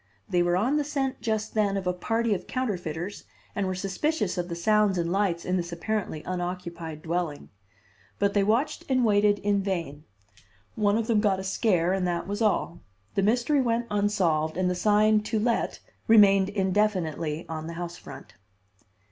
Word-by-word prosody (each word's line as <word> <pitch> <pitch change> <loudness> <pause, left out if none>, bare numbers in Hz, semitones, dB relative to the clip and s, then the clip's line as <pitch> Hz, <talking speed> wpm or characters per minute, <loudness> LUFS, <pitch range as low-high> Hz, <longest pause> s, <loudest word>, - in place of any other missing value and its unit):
They 175 - +1
were 175 0 +2
on 250 +10 +1
the 295 - +1
scent 275 -2 -2
just 220 -2 -2
then 205 -2 +1
of 195 - -4
a 180 - +1
party 225 +5 0
of 190 - -4
counterfeiters 185 -7 -3 0.3
and 200 -2 -1
were 185 - -2
suspicious 195 - -1
of 175 0 -3
the 170 - -3
sounds 210 +2 +2
and 170 0 -1
lights 185 -3 0
in 185 +1 0
this 175 -1 -3
apparently 170 -3 -3
unoccupied 175 -3 -5
dwelling. 165 -3 -3 0.7
But 200 0 +1
they 200 - +3
watched 230 +9 0
and 255 -2 +3
waited 205 -1 +4
in 200 -1 +1
vain. 165 -6 -4 0.7
One 205 -1 +2
of 230 - -1
them 225 -2 +2
got 200 -3 +2
a - - -5
scare 190 -3 +1
and 190 -2 0
that 175 0 -2
was 205 +3 -3
all. 200 -5 +1 0.3
The - - +1
mystery 245 +7 +2
went 235 -1 0
unsolved 175 -7 +1
and 185 -1 +1
the - - +1
sign 210 +3 +3
"To 220 +1 -2
Let" 230 +2 0 0.3
remained 200 -3 +6
indefinitely 185 -6 0
on 160 0 -5
the 170 - -6
house 175 0 -5
front. 135 - -12
195 Hz, 180 wpm, -27 LUFS, 175-215 Hz, 0.7 s, remained